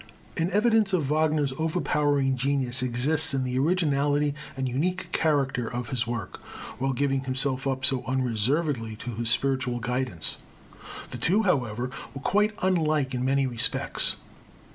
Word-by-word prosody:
An 165 +2 0
evidence 210 0 +3
of 150 -6 +1
Wagner's 155 -3 +2
overpowering 145 -4 +1
genius 135 -1 0
exists 135 +5 +1
in 130 - 0
the 125 0 -1
originality 145 -2 +2 0.2
and 130 -1 -1
unique 175 +9 -2
character 135 -6 +1
of 120 -1 -4
his 125 -2 -1
work, 120 -1 -4 0.4
while 135 +1 +1
giving 135 +1 0
himself 130 +1 -1
up 130 -1 -1
so 130 -1 +4
unreservedly 130 0 0
to 120 +3 -6
this 115 +1 -2
spiritual 130 -1 +1
guidance. 125 -7 -2 0.7
The - - -6
two, 205 +6 +3
however, 125 - 0 0.2
were 135 - -6
quite 210 +2 +2
unlike 155 -7 +1
in 125 0 -1
many 135 +1 +2
respects. 120 -3 0
135 Hz, 140 wpm, -26 LUFS, 125-155 Hz, 0.7 s, so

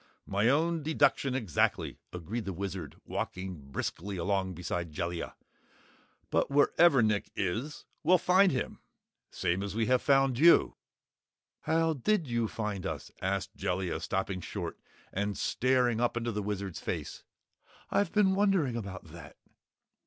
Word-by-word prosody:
"My 100 +4 +2
own 160 +4 +2
deduction, 145 -3 +2
exactly," 110 - 0
agreed 95 +7 -5
the 95 - -3
Wizard 95 -4 -5
walking 90 -7 -5
briskly 95 +8 -4
along 95 0 -1
beside 85 -1 -3
Jellia. 85 +2 -4 1.0
"But - - +2
wherever 145 -1 +5
Nick 105 -2 +1
is, 115 +11 -3 0.2
we'll 180 +4 +5
find 185 +3 +4
him 130 - -3 0.5
same 90 0 -1
as 100 0 -4
we 115 0 +1
have 125 +1 +3
found 135 -3 +3
you." 170 +3 +6 0.8
"How 165 0 +1
did 165 - +1
you 115 -2 0
find 105 -4 -4
us?" - - -5
asked 95 0 -2
Jellia, 90 -2 -2
stopping 95 -1 -2
short - - -5 0.3
and 100 +1 -1
staring 125 -2 +2
up 120 0 +1
into 120 0 -1
the 105 -1 -2
Wizard's 100 -4 -4
face. - - -4 0.7
"I've 200 -4 +2
been 205 -3 +4
wondering 190 - +2
about 100 -5 -5
that." 85 -3 -12
110 Hz, 140 wpm, -30 LUFS, 95-140 Hz, 1.0 s, you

